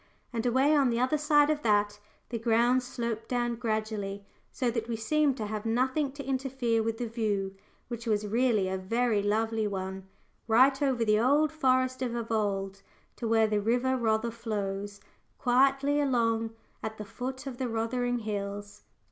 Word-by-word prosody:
And 230 -1 -1
away 265 +5 +3
on 275 -3 +4
the 235 0 0
other 260 +5 +1
side 295 0 +4
of 300 -1 -1
that, 205 -2 +2 0.3
the 235 - -3
ground 235 +3 +3
sloped 235 -3 -4
down 240 -1 0
gradually, 215 -3 -3 0.3
so 250 -3 -1
that 230 -1 -3
we 235 - -2
seemed 275 +5 +1
to 215 - -3
have 210 0 -4
nothing 260 +5 0
to 280 -1 -8
interfere 260 -3 0
with 225 0 -2
the 245 - -2
view, 210 -4 -2 0.3
which 235 -1 -6
was 210 -1 +1
really 225 -2 +2
a 190 0 -2
very 230 +2 +1
lovely 220 +1 0
one 190 -1 -5 0.4
right 260 +5 +5
over 260 -5 +1
the 215 0 +3
old 290 +6 +3
Forest 255 -4 +1
of 240 -2 -2
Evold, 205 -4 -2 0.4
to 235 - -3
where 225 0 +4
the 210 -1 0
river 245 +4 +1
Rother 230 -1 0
flows 205 -3 -4 0.4
quietly 275 +3 +3
along 230 -4 +1 0.3
at 220 0 -5
the 210 - -6
foot 260 +5 -6
of 260 -3 -6
the 255 -2 -1
Rothering 240 +2 -1
Hills. 205 -1 -5
230 Hz, 170 wpm, -29 LUFS, 215-255 Hz, 0.4 s, right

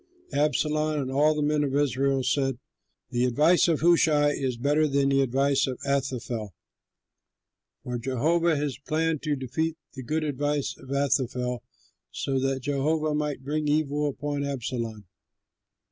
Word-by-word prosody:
Absalom 150 +1 +1
and 130 -2 -3
all 150 +3 +3
the 150 - 0
men 150 0 +2
of 140 -1 -1
Israel 135 -1 +1
said, 135 -1 0 0.5
"The 120 +1 +1
advice 150 +10 +4
of 165 -4 +1
Hushai 160 -3 +4
is 130 -4 -2
better 145 +5 +2
than 140 -1 +2
the 135 0 +3
advice 135 +2 +2
of 130 -2 -3
Ahithophel." 125 - -2 1.3
For 125 -1 -4
Jehovah 155 +7 +1
had 145 0 -1 0.2
planned 160 -1 0
to 150 -2 0
defeat 150 +5 -2 0.2
the 130 - -7
good 155 +6 -1
advice 145 0 -1
of 130 - -15
Ahithophel, 130 -3 0 0.5
so 135 - -2
that 135 0 -1
Jehovah 150 +3 0
might 150 -3 -2
bring 150 +2 -2
evil 150 0 +1
upon 145 0 -3
Absalom. 120 -6 -4
140 Hz, 145 wpm, -26 LUFS, 130-150 Hz, 1.3 s, advice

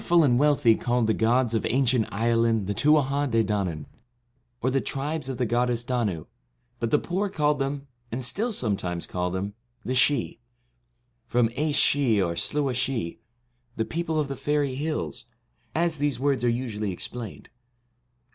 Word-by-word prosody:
The - - -12
powerful 170 -1 +5
and 125 -4 +3
wealthy 145 -5 +4
called 120 0 0
the 110 - +2
gods 115 +2 +2
of 115 - 0
ancient 125 -2 +2
Ireland 115 0 +1
the 100 - -1
Tuatha 145 +2 +3
De 115 -1 +2
Danaan, 95 -8 -2 0.7
or 130 - 0
the 135 0 +1
Tribes 145 0 -3
of 130 - -3
the 125 - 0
goddess 120 +1 +1
Danu, 115 -10 -1 0.5
but 115 - -1
the 150 - +4
poor 190 +6 -2
called 150 -3 +1
them, 140 +1 -2 0.3
and 120 +2 0
still 220 - +2
sometimes 100 - -2
call 90 0 -2
them, 95 +3 -3 0.3
the 130 - -1
Sidhe, 130 -2 +2 0.9
from 120 -2 +2
Aes 150 +1 0
Sidhe 135 -6 +3
or 85 - -2
Sluagh 140 - 0
Sidhe, 120 -8 -2 0.6
the 110 - -1
people 160 +1 -2
of 150 - 0
the 140 - -4
Faery 145 0 0
Hills, 145 - -3 0.5
as 165 -2 +1
these 145 -4 0
words 140 -2 +1
are 120 - +3
usually 115 -4 -2
explained. 110 +4 -6
125 Hz, 165 wpm, -26 LUFS, 115-145 Hz, 0.9 s, powerful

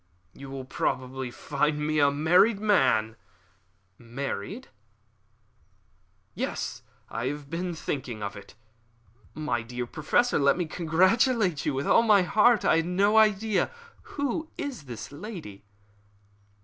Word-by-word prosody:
"You 135 0 -11
will 135 -1 -6
probably 130 0 -3
find 150 +4 -1
me 155 0 +1
a 140 -1 +5
married 175 +9 +3
man." 110 - +2 0.8
"Married!" 120 -3 -5 1.7
"Yes, - - -4 0.3
I 115 +2 -3
have 145 0 -5
been 175 +1 -3
thinking 125 -8 -4
of 100 - -4
it." 100 - -12 0.8
"My 145 -6 -1
dear 125 +2 -5
Professor, 155 - +1
let 140 +2 +3
me 175 - -1
congratulate 185 - +2
you 145 - 0
with 135 +1 -2
all - - +5
my 210 -4 +5
heart. 215 +5 +3
I - - +4
had 165 +1 0
no 200 +4 +2
idea. 215 -2 +2 0.5
Who 285 +3 -2
is 285 - -5
the 125 +3 -8
lady?" 155 - -9
155 Hz, 125 wpm, -27 LUFS, 130-205 Hz, 1.7 s, a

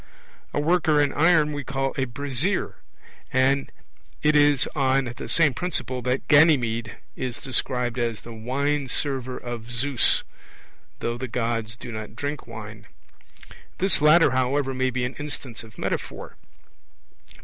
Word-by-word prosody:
A - - -1
worker 160 -1 +3
in 145 -2 +2
iron 160 -1 +4
we 145 0 -4
call 135 0 -2
a 135 - 0
'brazier'; 140 +8 -1 0.5
and 135 +2 +2 0.5
it 150 0 +4
is 145 -2 +4
on 130 -2 +1
the - - -6
same 155 -5 +4
principle 130 -5 -3
that 125 +2 -1
Ganymede 130 -7 +4 0.2
is 125 -2 -4
described 125 -1 -1
as 115 -2 -1
the 115 - -10
'wine 135 +5 -1
server' 130 -2 -2
of 120 -1 -7
Zeus, 125 +2 +2 0.8
though 120 0 -2
the 130 - -3
Gods 115 -2 -2
do 120 0 -9
not 110 -1 -7
drink 145 0 -4
wine. - - -9 0.9
This 190 -4 +2
latter, 150 0 +6
however, 130 +2 +1
may 130 0 +1
be 130 0 -2
an 125 - -4
instance 140 -5 -6
of 110 -1 -15
metaphor. - - -4
130 Hz, 140 wpm, -25 LUFS, 120-145 Hz, 0.9 s, latter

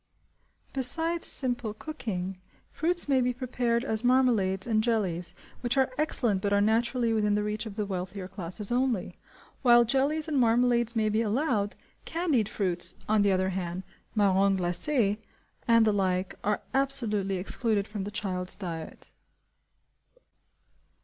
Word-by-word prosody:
Besides 325 +6 +2
simple 245 -5 0
cooking, 195 - -5 0.3
fruits 345 +1 +2
may 270 -2 +3
be 250 0 0
prepared 245 -2 -1
as 220 -4 -1
marmalades 235 -7 +2
and 220 -2 +1
jellies, 180 -7 -1 0.2
which 245 +2 -1
are 265 -1 +2
excellent 240 -9 0
but 200 - -1
are 200 - +3
naturally 230 +2 +1
within 210 -2 +1
the 210 - 0
reach 210 +2 -3
of 205 - -9
the 210 -1 -2
wealthier 185 0 -5
classes 190 +3 -5
only. 245 -5 0 0.5
While 240 -2 +6
jellies 280 +6 0
and 295 -3 0
marmalades 240 0 +2
may 215 -1 +1
be 215 +2 +1
allowed, 220 -2 0 0.3
candied 315 - 0
fruits,–on 195 +3 +1
the 200 -1 +3
other 185 0 +1
hand,–marrons 190 +2 -1
glacés, 205 - 0 0.5
and 230 -1 +5
the 215 - +3
like, 185 -2 0
are 210 0 -1
absolutely 235 -8 +1
excluded 205 +2 -1
from 210 -2 -5
the 200 - -5
child's 185 -3 -2
diet. 165 -5 -7
215 Hz, 135 wpm, -28 LUFS, 195-250 Hz, 0.5 s, While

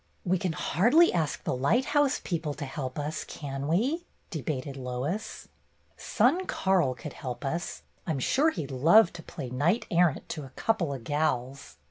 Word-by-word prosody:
"We 185 0 +2
can 180 -2 -1
hardly 235 - +4
ask 160 -5 -1
the - - -1
lighthouse 260 - +2
people 160 -5 -2
to 145 - -5
help 135 -1 -5
us, 150 +1 -3
can 140 -1 -5
we? 255 - 0
" - - -40
debated 140 -3 -3
Lois. 135 - -4 0.5
"Son 280 - +1
Karl 175 -9 +2
could 150 0 -8
help 130 -1 -6
us. 170 +5 -3 0.2
I - - -3
'm 155 - 0
sure 280 - +3
he 165 - -4
'd 135 - -10
love 170 - +5
to 175 - -8
play 145 -7 -7
knight 160 - +1
errant 170 -3 +2
to 155 -3 -4
'a 135 - -10
couple 195 -10 0
o' 140 - -3
gals. 135 - -2
160 Hz, 175 wpm, -28 LUFS, 135-190 Hz, 0.5 s, love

